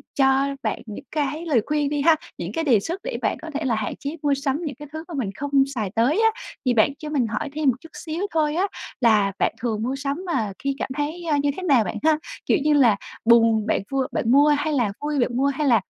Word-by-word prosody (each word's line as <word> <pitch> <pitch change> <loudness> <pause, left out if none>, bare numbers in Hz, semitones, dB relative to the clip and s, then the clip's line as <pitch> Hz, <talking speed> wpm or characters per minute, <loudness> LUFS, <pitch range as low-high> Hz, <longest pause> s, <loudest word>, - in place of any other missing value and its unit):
cho 270 0 +3
bạn - - -2
những 220 +5 -8
cái 300 +2 -2
lời 275 -8 +3
khuyên 295 -1 0
đi 290 -1 -1
ha, 325 +1 +6 0.2
những 175 +3 -5
cái 325 - -1
đề 245 -9 +4
xuất 345 - -5
để - - -3
bạn - - 0
có 325 - -7
thể 290 0 -2
là 240 - +1
hạn 215 -1 -3
chế 290 +4 -5
mua 285 - +3
sắm 275 +2 -1
những 285 - -4
cái 295 +3 -10
thứ 315 +1 -6
mà 345 - -9
mình 255 -9 -2
không 285 +3 -5 0.2
xài 215 -5 -1
tới 265 - +3
á, - - -12 0.2
thì 250 - +3
bạn 240 +5 +3
cho 305 - -6
mình 270 -6 +1
hỏi 220 +6 -3
thêm 300 -2 +2
một 250 - +2
chút 325 - -13
xíu 330 +4 -5
thôi 305 -2 +1
á, 380 +4 +2 0.3
là 210 -4 +4
bạn - - +2
thường 220 -3 -1
mua 260 +3 -1
sắm 280 +5 -3
mà 230 - -1
khi 275 0 -2
cảm - - -2
thấy, 310 +4 -3
a, 295 - +3
như 285 0 +1
thế 375 - -5
nào 275 -10 +4
bạn 195 - -4
ha? 310 -1 +4 0.3
Kiểu - - +3
như 300 0 +3
là, 245 -8 +5 0.3
buồn 225 -2 +5
bạn - - +1
vui 270 -1 0
bạn 230 - 0
mua 285 +2 +6
hay 305 +1 -1
là 240 -7 +1
vui 295 -1 -1
bạn 240 0 0
mua 275 - +2
hay 280 +1 0
là, 230 -5 +5
280 Hz, 265 wpm, -23 LUFS, 235-305 Hz, 0.3 s, ha